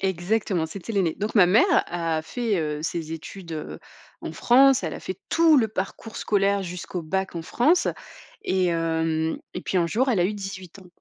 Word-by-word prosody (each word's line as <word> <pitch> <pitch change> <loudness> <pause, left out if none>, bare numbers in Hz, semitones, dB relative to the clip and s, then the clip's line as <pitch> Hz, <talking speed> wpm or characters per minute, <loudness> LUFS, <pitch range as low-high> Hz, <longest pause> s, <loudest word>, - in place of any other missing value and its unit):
Exactement, 190 -1 0
c'était 195 +6 -7
l'aînée. 185 -6 +1
Donc 210 +2 -3
ma 190 -4 +7
mère 200 +7 +5 0.2
a 165 -2 -2
fait, 225 +5 -2
heu, 150 -2 -2
ses 165 0 -3
études, 165 +2 -8
heu, 155 -1 -6 0.4
en - - -6
France, 265 0 +5
elle 160 - -3
a - - -7
fait 185 - -6
tout 330 -2 +5
le 230 -5 +3
parcours 215 +2 -5
scolaire 200 -1 +1
jusqu'au 180 0 -5
bac 190 +3 -2
en 165 - -4
France 315 - +2 0.6
et 185 -1 +1
hem 160 -1 0 0.2
et - - -3
puis 190 - -3
un 170 - +2
jour 240 +10 0
elle 225 - +1
a - - +3
eu 210 +3 0
18 195 -2 -8
ans. 185 - -15
185 Hz, 195 wpm, -24 LUFS, 165-210 Hz, 0.6 s, ma